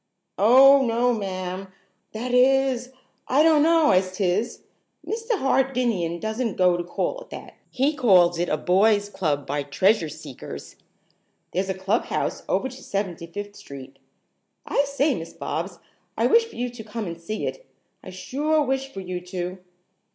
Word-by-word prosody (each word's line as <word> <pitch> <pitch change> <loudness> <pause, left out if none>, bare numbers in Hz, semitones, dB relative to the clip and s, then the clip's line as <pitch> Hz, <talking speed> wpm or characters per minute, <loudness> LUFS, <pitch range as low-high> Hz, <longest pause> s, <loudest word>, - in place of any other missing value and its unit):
"Oh, 270 +6 +7
no, 240 +1 +2
ma'am; 190 -2 -4 0.4
that 245 +3 -4
is, 260 0 +3 0.4
I 280 +4 +4
donno 320 0 +5
as 185 0 +1
'tis. 200 +4 -1 0.4
Mr. 455 0 -2
Hardinian 250 - 0
doesn't 220 +1 -3
go 180 -1 +4
to 175 - -2
call - - -3
it - - -13
that. - - -9 0.2
He 275 +4 +1
calls 180 - +4
it 175 - 0
a 155 - +1
boys' 205 +5 +3
club 150 -8 -1
by 145 +1 -2
Treasure 165 +5 +2
Seekers. 150 -3 -9 0.8
There's 190 +2 -1
a 190 - -1
clubhouse 190 +5 -1
over - - +1
to 260 0 -11
Seventy 190 -4 -4
fifth 205 +4 -7
Street. 135 -4 -11 0.7
I 280 - +1
say, 280 +1 +1
Miss 165 -7 -7
Bobs, - - -4 0.4
I - - +2
wish 460 0 +5
for 455 - -14
you 245 0 -3
to 240 -2 -9
come 220 0 -5
and 170 -2 -7
see 215 +6 -4
it. - - -6 0.3
I - - -9
sure 295 +12 0
wish 270 0 -2
for 195 - -7
you 180 -1 -5
to." 180 0 -4
210 Hz, 160 wpm, -24 LUFS, 180-265 Hz, 0.8 s, Oh